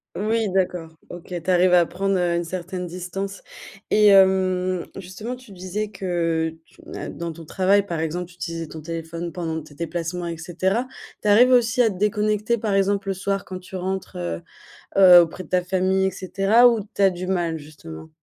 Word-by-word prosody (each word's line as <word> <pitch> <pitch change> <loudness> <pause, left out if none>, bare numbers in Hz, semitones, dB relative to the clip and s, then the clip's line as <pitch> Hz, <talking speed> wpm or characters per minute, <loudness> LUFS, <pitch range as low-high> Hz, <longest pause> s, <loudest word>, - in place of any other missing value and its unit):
Oui, 220 +2 0
d'accord, 180 -3 0 0.2
OK. 175 +1 -9
Tu 185 - -4
arrives 180 0 +4
à 175 -2 +5
prendre, 195 0 -1
heu, 175 -1 +1
une 170 - 0
certaine 180 +1 -5
distance. 185 +3 -6 0.5
Et 210 0 +5
hem, 185 -2 +3
justement, 195 +6 -6
tu 250 -3 -16
disais 190 +3 -4
que 165 -4 -1
tu, - - -22
hein, - - -6
dans 170 -1 -5
ton 165 0 -11
travail, 195 +4 +2
par 170 -5 -4
exemple, 165 +2 -3
tu 175 - -17
utilisais 165 -2 -5
ton 160 - -9
téléphone 165 +1 -5
pendant 160 -3 -4
tes 150 -1 -15
déplacements, 170 +2 -4
et 165 -1 -4
cetera. 185 +8 -1 0.4
Tu - - -1
arrives 235 +5 +6
aussi 250 0 +4
à 230 - +4
te 200 - -6
déconnecter, 210 +3 0
par 210 -2 -1
exemple, 195 0 +1
le 195 - -1
soir, 195 +1 -2
quand 185 - -7
tu 185 +1 -11
rentres, 190 +1 -4
heu, 85 -1 -4 0.5
heu, 185 -2 +9
auprès 170 +2 -2
de - - -17
ta 180 0 +1
famille, 190 +1 +1
et - - +1
cetera, 195 +6 +3
ou 230 -2 +1 0.2
tu - - +1
as 195 - +6
du 180 0 -6
mal, 175 -3 0
justement? 145 - -11
185 Hz, 200 wpm, -23 LUFS, 170-195 Hz, 0.5 s, heu